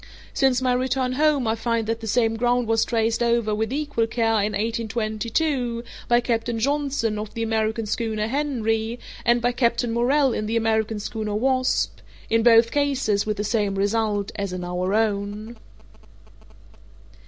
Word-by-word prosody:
Since 260 -2 +2
my 255 -1 +2
return 255 0 0
home 290 -1 +2
I 220 - +2
find 230 0 -1
that 225 +1 -2
the 225 - -7
same 225 0 +2
ground 245 +1 +1
was 225 0 +2
traced 225 -1 0
over, 235 -2 +1
with 220 +2 -1
equal 285 -5 -1
care, 225 -1 0
in 210 +1 -1
1822, 230 +4 -1 0.2
by 240 0 +4
Captain 235 -1 -1
Johnson, 270 -4 0
of 210 0 -7
the 230 - -2
American 220 0 -1
schooner 215 0 -2
Henry, 230 -4 -1 0.3
and 235 0 +3
by 245 - +3
Captain 235 -1 0
Morrell 260 +3 +2
in 215 - -2
the 230 +1 0
American 220 -1 0
schooner 215 0 -4
Wasp—in 255 -2 0
both 230 0 +5
cases 270 -8 0
with 215 0 -1
the 205 - -1
same 210 -2 0
result 205 0 0
as 200 -2 -3
in 180 0 -5
our 180 +2 -1
own. 215 +1 -1
225 Hz, 155 wpm, -23 LUFS, 215-245 Hz, 0.3 s, both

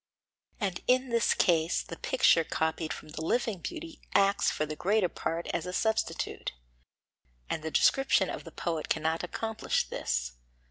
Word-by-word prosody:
And 195 -5 -2
in 255 +1 +3
this 235 -1 +3
case 165 -1 +2
the - - -8
picture 210 -10 +4
copied 160 0 -1
from - - -7
the 155 - -6
living 225 +1 0
beauty 330 - -7
acts 200 0 +4
for 155 - -1
the 155 0 -5
greater 195 +2 +2
part 165 +1 -3
as 170 - -2
a 180 - -4
substitute; 220 +3 -1 1.0
and 160 - -1
the 160 - -3
description 270 - +3
of - - -5
the - - -10
poet 165 -3 -3
cannot 160 +2 0
accomplish 220 +5 -1
this. - - -1
180 Hz, 155 wpm, -30 LUFS, 160-225 Hz, 1.0 s, picture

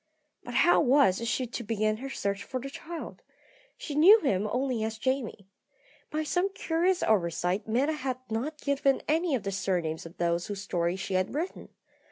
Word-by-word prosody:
But 245 - -7
how 350 - +5
was 245 -5 +3
she 255 - 0
to 240 0 -6
begin 215 -1 0
her 270 +4 -6
search 200 -5 -2
for 260 - -4
the 275 +2 -7
child? 335 +3 -8 0.6
She 295 - -6
knew 360 +10 +8
him 205 -8 +1
only 250 -3 0
as 220 0 -3
Jamie. 260 -5 -2 0.6
By 310 +1 -2
some 355 +5 0
curious 345 +3 +1
oversight 180 0 +1
Meta 260 +8 +1
had 260 -4 -3
not 250 +8 -3
given 280 -1 +1
any 320 0 +2
of 230 - -3
the 195 - -2
surnames 175 -5 -2
of 165 - -16
those 170 +1 0
whose 205 -2 -5
story 175 -3 -1
she 190 0 -5
had 185 +6 0
written. 335 +5 -4
240 Hz, 180 wpm, -28 LUFS, 195-285 Hz, 0.6 s, knew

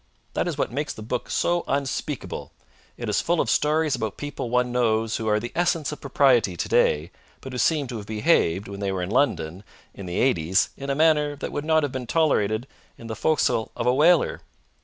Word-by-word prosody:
That - - -1
is - - -3
what - - -1
makes 145 +4 -3
the 110 - -9
book 120 +3 -3
so 175 0 +1
unspeakable. 140 -1 -3 0.4
It - - -5
is - - +1
full 170 0 0
of - - +1
stories 155 0 +2
about 110 -4 -4
people 145 -4 -5
one 125 0 +1
knows 115 -2 +1
who 110 - -4
are 105 0 +3
the 120 +2 -6
essence 165 -5 +1
of 150 - -8
propriety 125 -9 +3
today, 75 +2 +1 0.3
but 135 - -9
who 125 - -3
seem 155 0 +2
to 120 - -4
have 100 -1 -8
behaved, 105 - +1
when 100 0 -7
they 100 -1 -1
were 95 -2 -2
in 90 - -4
London 90 - 0 0.3
in 100 -2 -9
the 90 - -4
'eighties, 95 -8 +2
in 140 0 -7
a 140 - +1
manner 150 -1 +3
that 145 - -5
would 145 0 -4
not 160 -1 +3
have 145 - -1
been 130 -2 -5
tolerated 120 -8 +1 0.3
in 115 - -12
the 110 -1 -5
fo'c'sle 125 -3 +1
of 115 - -2
a 125 - +4
whaler. 165 +5 +3
125 Hz, 215 wpm, -24 LUFS, 105-150 Hz, 0.4 s, a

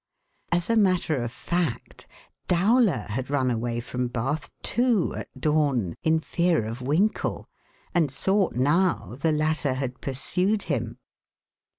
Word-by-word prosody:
As 170 0 +2
a - - +3
matter 185 -7 +2
of 120 -1 -3
fact, 170 -2 -3 0.4
Dowler 205 +4 +3
had 130 +5 -3
run 130 -3 +1
away 120 0 -2
from 125 +1 -3
Bath, 130 +6 -3
too, 235 -4 +1
at - - -6
dawn, 145 - +1
in 160 0 +2
fear 170 -5 +1
of 115 +3 -5
Winkle, 160 +12 0 0.5
and 160 -6 +2
thought 190 +7 +1
now 150 +1 +1
the 160 - +2
latter 150 -3 +1
had 130 -1 -4
pursued 180 +10 0
him. 120 -6 -3
150 Hz, 130 wpm, -26 LUFS, 125-180 Hz, 0.5 s, a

